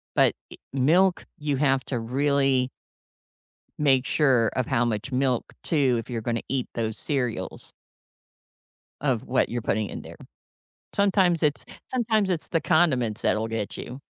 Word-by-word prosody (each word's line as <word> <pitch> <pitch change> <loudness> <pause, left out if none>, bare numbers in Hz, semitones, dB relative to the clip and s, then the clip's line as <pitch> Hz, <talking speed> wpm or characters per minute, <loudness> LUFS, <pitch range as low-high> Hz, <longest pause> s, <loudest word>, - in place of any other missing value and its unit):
But, - - +5 0.2
eh - - -8 0.2
milk, 175 +8 +3
you 145 -2 -1
have 135 -1 +2
to 125 - -2
really 135 +1 +1 1.1
make 135 -4 +3
sure 130 -8 +3
of 130 - 0
how 115 - +1
much 115 +3 -2
milk, 130 -2 0
too, 135 -6 +2
if 115 - -8
you're 120 -2 -3
gonna 115 0 -1
eat 135 -2 -1
those 110 -2 -2
cereals 125 -6 -3 1.3
of 130 -6 0
what 130 +1 +2
you're 120 0 -2
putting 110 -1 0
in - - -6
there. - - -11 0.8
Sometimes 190 -4 +3
it's 150 -2 +1 0.2
sometimes 220 -5 +1
it's 170 -4 -2
the 165 - +1
condiments 130 -11 +2
that'll 110 +1 +1
get 110 -2 -3
you. 125 - -7
135 Hz, 150 wpm, -25 LUFS, 120-150 Hz, 1.3 s, But